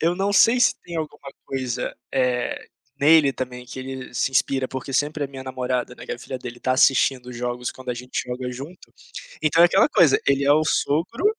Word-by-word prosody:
Eu 170 Hz, +2 st, +2 dB
não 195 Hz, +2 st, -1 dB
sei 230 Hz, +4 st, +5 dB
se -, -, +4 dB
tem 170 Hz, -1 st, -7 dB
alguma 145 Hz, -3 st, -6 dB
coisa, 130 Hz, -3 st, -3 dB, 0.2 s
eh, 125 Hz, -2 st, -1 dB, 0.3 s
nele 150 Hz, -1 st, +5 dB
também 125 Hz, -1 st, -6 dB
que 130 Hz, -, -9 dB
ele 130 Hz, -1 st, -7 dB
se 125 Hz, +2 st, 0 dB
inspira 130 Hz, 0 st, +1 dB
porque 130 Hz, +1 st, -6 dB
sempre 145 Hz, +2 st, 0 dB
a -, -, -2 dB
minha 135 Hz, -1 st, -9 dB
namorada, 125 Hz, -1 st, -3 dB
né, -, -, -12 dB
que -, -, -4 dB
a 120 Hz, -, -6 dB
filha 130 Hz, +1 st, -6 dB
dele, 120 Hz, 0 st, -9 dB
tá 130 Hz, -, +1 dB
assistindo 130 Hz, -1 st, +3 dB
jogos 120 Hz, 0 st, -3 dB
quando 130 Hz, -1 st, -7 dB
a -, -, -2 dB
gente 125 Hz, +1 st, -4 dB
joga 125 Hz, 0 st, -4 dB
junto 145 Hz, +8 st, -10 dB, 0.5 s
então 155 Hz, +2 st, +4 dB
é -, -, +9 dB
aquela 175 Hz, -, +4 dB
coisa, 170 Hz, -, +4 dB
ele 140 Hz, 0 st, +2 dB
é 145 Hz, -, +5 dB
o 155 Hz, +1 st, +4 dB
sogro, 170 Hz, -, 0 dB
135 Hz, 210 wpm, -23 LUFS, 125-150 Hz, 0.5 s, é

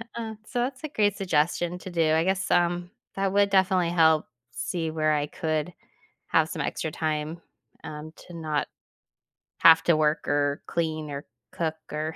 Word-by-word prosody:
Uh, 225 Hz, -2 st, -5 dB
so 240 Hz, -, -3 dB
that's 255 Hz, +3 st, -2 dB
a 310 Hz, -, -3 dB
great 205 Hz, -7 st, +1 dB
suggestion 175 Hz, -1 st, 0 dB
to 185 Hz, -, -8 dB
do, 165 Hz, -3 st, +2 dB
I 160 Hz, +1 st, +3 dB
guess, 190 Hz, +2 st, 0 dB
um, 175 Hz, 0 st, +1 dB, 0.2 s
that 195 Hz, 0 st, 0 dB
would 200 Hz, 0 st, +4 dB
definitely 190 Hz, -2 st, +3 dB
help 160 Hz, -2 st, +4 dB, 0.2 s
see 165 Hz, +5 st, -3 dB
where 155 Hz, -1 st, +1 dB
I 145 Hz, -1 st, +1 dB
could 155 Hz, +2 st, -2 dB, 0.6 s
have 160 Hz, -1 st, +3 dB
some -, -, -3 dB
extra 160 Hz, -, -2 dB
time, 155 Hz, +1 st, -2 dB, 0.4 s
um, 155 Hz, +1 st, -7 dB, 0.2 s
to 175 Hz, -, -10 dB
not 155 Hz, -3 st, -2 dB, 0.9 s
have 165 Hz, -1 st, +8 dB
to 170 Hz, -, +4 dB
work 150 Hz, 0 st, +1 dB
or 145 Hz, 0 st, 0 dB
clean 155 Hz, -3 st, -2 dB
or 140 Hz, 0 st, -6 dB, 0.3 s
cook 160 Hz, -2 st, -2 dB, 0.2 s
or 155 Hz, +1 st, -3 dB
165 Hz, 170 wpm, -26 LUFS, 155-185 Hz, 0.9 s, have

